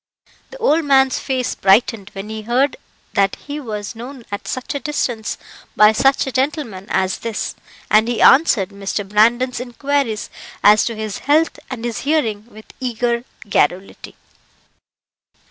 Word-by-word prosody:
The - - -10
old 330 -9 +2
man's 270 -2 +3
face 260 -2 -2
brightened 200 +1 +2
when 195 +2 -7
he 220 0 -5
heard 250 +6 +1 0.4
that 195 -1 +2
he 290 +1 -7
was 215 -5 -6
known 245 +1 -9
at 205 - -5
such 255 +3 -4
a 285 - -2
distance 250 -7 -2 0.4
by 210 0 +7
such 270 +5 +2
a 265 - -4
gentleman 260 - -2
as 190 0 0
this, 230 -2 -3 0.4
and 215 +2 +5
he 240 -1 -1
answered 260 - +5
Mr. 200 0 -4
Brandon's 235 +5 +2
inquiries 250 -2 -2 0.3
as 210 +1 +6
to 230 - -3
his 215 -2 -5
health 315 +3 +3
and 240 -3 -5
his 235 -2 -3
hearing 235 -8 -1
with 220 -2 -14
eager 240 -1 -1 0.2
garrulity. 190 0 -1
235 Hz, 145 wpm, -19 LUFS, 210-270 Hz, 0.4 s, by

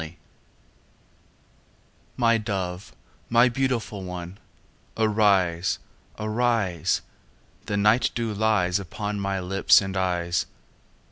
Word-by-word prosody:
XIV 80 +1 -8 2.0
My 115 -2 +3
dove, 95 -3 -4 0.3
my 120 +2 +5
beautiful 120 -6 -2
one, 90 +1 -7 0.6
Arise, 100 -6 +2 0.4
arise! 110 -6 0 0.7
The 100 -2 -1
night 105 +4 +3
dew 115 -2 -2
lies 100 -3 +1
Upon 105 +2 -4
my 100 -1 -1
lips 95 +2 +4
and 95 -1 -4
eyes. 90 -2 0
100 Hz, 90 wpm, -25 LUFS, 90-110 Hz, 2.0 s, my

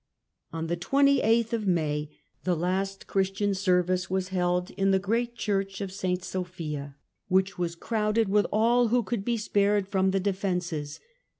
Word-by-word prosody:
On 165 0 -3
the 170 +1 -1
28th 235 0 +3
of 220 -3 -1
May 150 -4 0 0.3
the 180 0 +1
last 190 +3 -2
Christian 195 +1 0
service 185 -1 +1
was 185 0 -1
held 180 -1 0
in 195 0 0
the 195 - +4
great 230 +5 -1
Church 195 -3 -2
of 195 -2 -4
St. 185 -1 -2
Sophia, 165 -7 -5 0.3
which 190 0 +1
was 170 -1 -1
crowded 215 +3 0
with 205 +1 +2
all 235 +3 +3
who 240 +2 +2
could 210 0 -3
be 235 +2 0
spared 205 -2 +1
from 190 -1 +1
the 195 +1 +1
defences. 180 -6 -2
190 Hz, 160 wpm, -27 LUFS, 180-210 Hz, 0.3 s, the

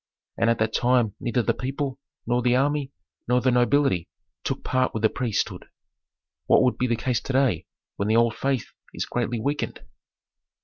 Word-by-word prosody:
And 115 - +2
at 115 - +2
that 110 0 0
time 120 -4 +2
neither 120 0 0
the - - +2
people, 135 +1 -3 0.3
nor 120 +1 +1
the 125 0 +3
army, 140 +1 +1 0.4
nor 125 +1 +3
the 130 +1 +2
nobility 125 - +2 0.3
took - - -3
part 130 -2 0
with 110 - -3
the 110 - +5
priesthood. 120 -5 -2 0.8
What - - +5
would 125 - +1
the 125 -2 +1
case 120 +1 0
be - - -22
to 135 - -2
day 130 - +2 0.3
when 100 - -1
the 110 - +3
old 115 -1 +4
faith 135 -4 -2 0.2
is - - -2
greatly 120 -1 -2
weakened?" 145 +6 -2
125 Hz, 180 wpm, -25 LUFS, 115-130 Hz, 0.8 s, the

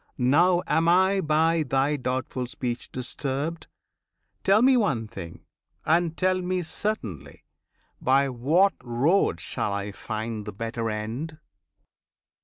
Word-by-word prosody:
Now 170 +8 +3
am 165 +1 +1
I 190 +3 +4
by 160 +1 +2
thy 135 +1 +1
doubtful 130 -1 -3
speech 120 -1 -4
disturbed! 140 +5 -3 0.8
Tell 205 +4 +4
me 265 0 +6
one 140 - +1
thing, 85 -5 -9 0.4
and 165 0 +2
tell 185 0 +1
me 180 0 -1
certainly; 155 - -4 0.6
By 135 +2 +3
what 150 +10 +2
road 125 - +2
shall 100 - -2
I 100 0 -3
find 110 0 -5
the 105 - -5
better 115 +2 -3
end? 115 +9 -4
140 Hz, 120 wpm, -26 LUFS, 115-175 Hz, 0.8 s, me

